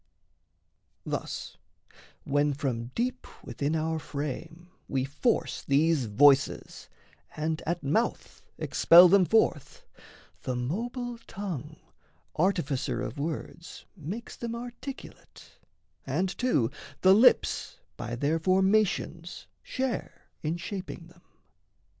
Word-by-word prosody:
Thus, - - -5 0.7
when 145 0 +1
from 125 -5 -2
deep 250 +2 -2 0.2
within 140 +5 -2
our 160 0 -1
frame 160 +4 -6 0.2
we 130 -1 -1
force 150 - 0
These 145 0 +2
voices, 140 +6 +3 0.5
and 155 +1 -1
at 170 +1 -1
mouth 190 +13 -1 0.2
expel 175 +2 +7
them 195 0 +5
forth, 175 -8 +1 0.6
The 130 - -3
mobile 235 - -3
tongue, 160 -7 -5 0.6
artificer 155 -9 0
of 140 - -5
words, 165 +2 -6
Makes 195 +7 -7
them 235 -1 -4
articulate, 245 +3 -10 0.5
and 180 +7 -1
too 150 - +1 0.3
the 190 0 +7
lips 225 +6 +4 0.2
By 120 - -5
their 145 +6 0
formations 190 -2 +1 0.2
share 255 -9 -4
in 160 +2 -2
shaping 175 -1 -7
them. 175 0 -21
165 Hz, 100 wpm, -28 LUFS, 145-200 Hz, 0.7 s, expel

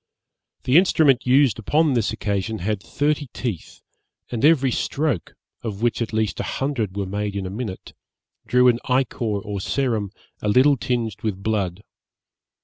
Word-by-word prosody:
The 130 +5 +4
instrument 150 -9 +3
used 130 -2 +4
upon 150 +6 +2
this 115 -4 +1
occasion 100 +2 -2
had 105 +1 -2
thirty 145 +5 -1
teeth, 115 -10 -5 0.5
and 120 -2 -3
every 140 -4 +5
stroke, 140 - -2 0.3
of 110 -2 -5
which 120 0 +1
at 115 - -2
least 110 -1 -1
a - - -1
hundred 120 -8 -2
were 100 - -1
made 100 +1 -3
in 100 -1 -3
a 95 - -5
minute, 105 -3 -6 0.5
drew 125 0 +4
an 120 -1 +4
ichor 125 -1 0 0.2
or 100 0 -5
serum 115 -5 -1 0.3
a 105 - -1
little 130 +6 +5
tinged 115 -5 -2
with 100 -3 -3
blood. 100 -3 -1
115 Hz, 155 wpm, -22 LUFS, 100-130 Hz, 0.5 s, every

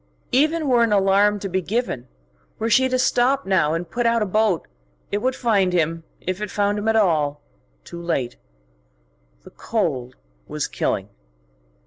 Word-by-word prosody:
Even 305 +4 +2
were 245 -3 +4
an 230 -2 +3
alarm 200 +1 +3
to 195 - -3
be 190 0 -1
given, 190 - -2 0.5
were 225 +1 -2
she 260 +4 +4
to 255 - +1
stop 255 +2 +2
now 165 -5 +2
and 170 +1 -4
put 240 -1 0
out 230 -1 +2
a - - -1
boat, 210 -3 +1 0.4
it 205 - 0
would 255 +4 0
find 200 -7 +1
him, 165 -1 0 0.2
if 185 +2 -4
it 210 - -3
found 205 +1 0
him 210 - -4
at 225 - +3
all, 155 -8 +2 0.4
too 170 - -9
late. 135 -8 -2 1.1
The - - -14
cold 135 - -2 0.3
was - - -3
killing. - - -2
205 Hz, 165 wpm, -22 LUFS, 170-235 Hz, 1.1 s, were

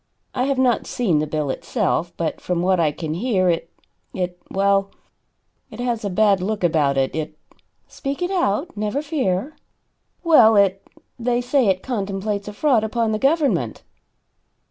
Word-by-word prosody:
I 255 - 0
have 275 -1 0
not 255 -2 +2
seen 185 -11 +1
the 155 - -1
bill 150 -2 -1
itself, 175 - -1
but 165 -2 -3
from 175 -1 -1
what 185 0 +2
I 155 -3 +2
can 155 +1 -5
hear, 185 -1 +1
it 165 0 -3 0.5
it 180 -1 -3
well, 195 0 +2 0.8
it - - -11
has 240 -3 -2
a 200 - -1
bad 200 0 +3
look 205 +1 -2
about 150 -5 +2
it. 135 -1 0
It 155 -1 -4 0.3
" - - -49
"Speak 280 +4 -4
it 355 - -1
out 340 - 0
never 215 +7 -2
fear." 275 - -1 0.7
"Well, 245 -10 +6
it 195 -1 +3 0.4
they 240 0 +1
say 245 0 +2
it 190 -1 +1
contemplates 200 -3 -3
a 210 - -6
fraud 245 -1 +2
upon 225 0 0
the 215 - -1
government." 290 +2 +1
205 Hz, 165 wpm, -21 LUFS, 180-250 Hz, 0.8 s, Well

